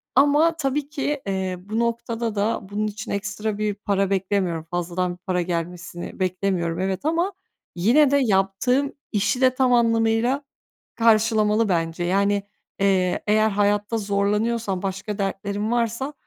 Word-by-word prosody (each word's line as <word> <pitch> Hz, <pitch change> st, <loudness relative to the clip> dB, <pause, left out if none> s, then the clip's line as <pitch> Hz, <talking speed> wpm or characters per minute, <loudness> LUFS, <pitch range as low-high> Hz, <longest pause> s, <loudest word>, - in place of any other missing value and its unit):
ama, 295 Hz, +5 st, +4 dB
tabii 285 Hz, -1 st, -1 dB
ki, 295 Hz, -1 st, -2 dB
eee, 190 Hz, -1 st, -1 dB
bu 210 Hz, +5 st, -4 dB
noktada 235 Hz, -1 st, -2 dB
da 210 Hz, +3 st, 0 dB
bunun 210 Hz, +1 st, -1 dB
için 210 Hz, 0 st, -6 dB
ekstra 205 Hz, +1 st, -3 dB
bir 210 Hz, 0 st, 0 dB
para 195 Hz, -1 st, -1 dB
beklemiyorum, 190 Hz, -4 st, 0 dB
fazladan 175 Hz, +1 st, -2 dB
bir -, -, -13 dB
para 180 Hz, -1 st, -1 dB
gelmesini 175 Hz, +1 st, -5 dB
beklemiyorum, 185 Hz, -2 st, -1 dB
evet, 190 Hz, +4 st, -2 dB
ama 340 Hz, +5 st, +1 dB, 0.4 s
yine 250 Hz, -, +4 dB
de 285 Hz, -, +4 dB
yaptığım 250 Hz, +4 st, +1 dB, 0.2 s
işi 215 Hz, +4 st, 0 dB
de 255 Hz, -1 st, +5 dB
tam 255 Hz, -1 st, +3 dB
anlamıyla 230 Hz, +3 st, +2 dB, 0.5 s
karşılamalı 220 Hz, -1 st, +3 dB
bence. 165 Hz, -1 st, -1 dB
Yani, 200 Hz, +3 st, +1 dB, 0.4 s
eee, 190 Hz, -2 st, +2 dB
eğer 215 Hz, +1 st, +4 dB
hayatta 205 Hz, +2 st, +1 dB
zorlanıyorsam, 205 Hz, 0 st, 0 dB
başka 195 Hz, +2 st, -4 dB
dertlerim 200 Hz, +2 st, -2 dB
varsa, 240 Hz, +4 st, -1 dB
205 Hz, 135 wpm, -23 LUFS, 190-235 Hz, 0.5 s, de